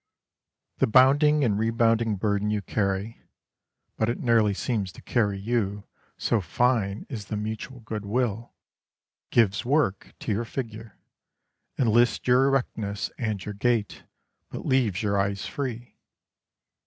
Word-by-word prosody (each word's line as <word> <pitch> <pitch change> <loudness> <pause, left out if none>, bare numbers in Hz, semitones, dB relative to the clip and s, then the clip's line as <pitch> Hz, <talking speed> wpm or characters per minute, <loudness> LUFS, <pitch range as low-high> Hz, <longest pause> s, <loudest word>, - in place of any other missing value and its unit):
The - - +3
bounding 145 +5 +5
and 105 -5 +1
rebounding 115 0 +2
burden 100 +1 0
you 105 -1 -1
carry 100 +2 -2 0.8
(but 110 - +1
it 120 - -2
nearly 110 -4 +3
seems 105 -5 -2
to - - -13
carry 105 -5 +1
you, 105 -2 -1 0.3
so 115 - +1
fine 105 +2 0
is 110 -6 -6
the 105 - -4
mutual 110 +5 -5
good 110 -2 -5
will) 115 +1 -1 0.8
gives 110 -2 +2
work 130 -6 0
to - - -2
your 105 +3 0
figure, 115 -2 -7 0.8
enlists 120 -1 +2
your 125 +2 +5
erectness 110 -6 -1
and 110 -6 -2
your 105 - -4
gait, 110 0 -1 0.4
but - - -7
leaves 115 -7 +1
your 100 -1 +1
eyes 100 0 -1
free. 125 -3 -5
110 Hz, 130 wpm, -26 LUFS, 100-120 Hz, 0.8 s, bounding